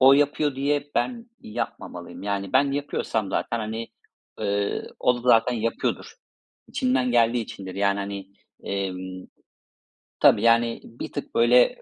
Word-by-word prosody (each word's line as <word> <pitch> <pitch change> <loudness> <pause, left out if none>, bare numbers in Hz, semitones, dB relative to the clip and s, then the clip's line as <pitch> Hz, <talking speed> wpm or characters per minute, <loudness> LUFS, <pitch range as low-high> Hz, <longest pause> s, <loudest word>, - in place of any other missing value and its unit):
o 130 +1 +8
yapıyor 145 0 +2
diye 145 +1 0
ben 235 -2 -1
yapmamalıyım. 105 - -6
Yani, 100 -1 -2
ben 140 +1 +4
yapıyorsam 115 -7 -2
zaten, 115 - -1
hani, 110 +1 -4 0.5
ııı, 100 0 -1
o 125 - +3
da - - -6
zaten 120 +1 +5
yapıyordur. 115 0 -2 0.5
İçinden 125 0 +1
geldiği 120 0 +3
içindir. 95 -3 -8
Yani, 100 0 +1
hani, 100 -1 -5 0.4
emm, 95 -1 -4 0.9
tabii, - - +6
yani, 115 0 +3
bir - - -8
tık - - -6
böyle 120 +1 +5
115 Hz, 130 wpm, -25 LUFS, 100-130 Hz, 0.9 s, o